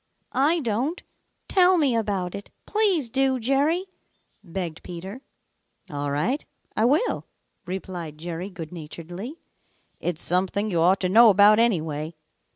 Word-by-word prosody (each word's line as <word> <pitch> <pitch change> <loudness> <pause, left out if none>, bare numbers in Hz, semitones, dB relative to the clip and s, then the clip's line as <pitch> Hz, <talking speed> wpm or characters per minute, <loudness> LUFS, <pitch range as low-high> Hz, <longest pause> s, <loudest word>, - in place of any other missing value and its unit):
"I 310 +6 +2
don't. 255 - -2 0.4
Tell 370 -1 +4
me 280 -7 +2
about 200 -5 -1
it. 200 - -8 0.2
Please 400 - +3
do, 265 +2 +1
Jerry," 285 +9 +1 0.6
begged 175 -3 -5
Peter. 190 +8 -8 0.7
"All 145 0 -3
right, 180 - 0 0.3
I 220 - +2
will," 295 - +1 0.4
replied 180 -4 -6
Jerry 170 +3 -5
good 170 -4 -8
naturedly. 175 - -8 0.6
"It's 175 -3 -1
something 190 +4 +1
you 170 -2 +1
ought 185 +4 +4
to 185 - +1
know 225 +4 +8
about, 210 +2 +6
anyway. 160 -8 0
200 Hz, 130 wpm, -25 LUFS, 175-265 Hz, 0.7 s, know